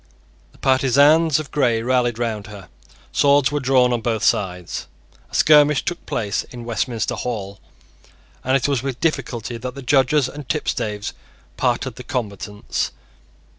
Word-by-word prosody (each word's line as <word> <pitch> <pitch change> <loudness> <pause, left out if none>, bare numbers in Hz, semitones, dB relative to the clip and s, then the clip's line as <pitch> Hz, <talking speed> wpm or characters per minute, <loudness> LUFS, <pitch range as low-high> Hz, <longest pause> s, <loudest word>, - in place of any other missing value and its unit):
The - - -22
partisans 140 +4 +4
of 155 -4 -7
Grey 120 -6 +1
rallied 120 -2 +1
round 110 -4 -3
her. 100 -3 -11 0.4
Swords 140 -1 +4
were 145 - 0
drawn 130 -2 +3
on 120 - -1
both 110 -2 -1
sides; 90 -3 -1 0.4
a - - -9
skirmish 150 -1 +5
took 175 - -3
place 105 -4 -1
in 120 -2 -10
Westminster 115 0 -2
Hall; 100 -5 -4 0.8
and 130 +2 +3
it 135 - -1
was 140 -4 0
with 130 -2 -4
difficulty 125 -7 -2
that 125 +2 -6
the 140 - -8
Judges 135 +1 +3
and 145 -1 -9
tipstaves 105 -8 -2 0.4
parted 125 - -1
the 125 - -8
combatants. 105 -6 -3
125 Hz, 145 wpm, -21 LUFS, 115-140 Hz, 0.8 s, skirmish